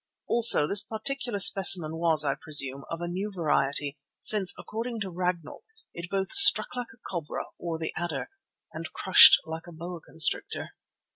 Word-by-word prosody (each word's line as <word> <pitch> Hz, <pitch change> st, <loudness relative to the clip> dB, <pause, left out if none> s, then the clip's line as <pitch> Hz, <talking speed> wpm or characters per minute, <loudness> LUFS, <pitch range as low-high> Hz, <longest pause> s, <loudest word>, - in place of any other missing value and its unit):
Also 235 Hz, -10 st, +3 dB
this 200 Hz, +6 st, +2 dB
particular 240 Hz, +1 st, -6 dB
specimen 185 Hz, -5 st, +4 dB
was, 160 Hz, -3 st, -1 dB
I 140 Hz, -, -1 dB
presume, 140 Hz, -3 st, -2 dB
of 165 Hz, +1 st, -8 dB
a 175 Hz, -, -6 dB
new 190 Hz, +4 st, -6 dB
variety, 145 Hz, -4 st, -1 dB, 0.2 s
since, 205 Hz, -4 st, +2 dB
according 230 Hz, +1 st, -8 dB
to 195 Hz, -2 st, -7 dB
Ragnall, 175 Hz, -3 st, -6 dB, 0.3 s
it 170 Hz, 0 st, -10 dB
both 195 Hz, -1 st, -5 dB
struck 395 Hz, -8 st, +7 dB
like 245 Hz, -1 st, -7 dB
the 230 Hz, -, -20 dB
cobra 170 Hz, -5 st, -7 dB, 0.2 s
or 170 Hz, -2 st, -7 dB
the 160 Hz, 0 st, -7 dB
adder, 175 Hz, -, -7 dB, 0.4 s
and -, -, -9 dB
crushed -, -, +5 dB
like 160 Hz, +1 st, -10 dB
the 175 Hz, -, -14 dB
boa 170 Hz, +1 st, -11 dB
constrictor. 160 Hz, 0 st, -2 dB
175 Hz, 160 wpm, -24 LUFS, 160-200 Hz, 0.4 s, struck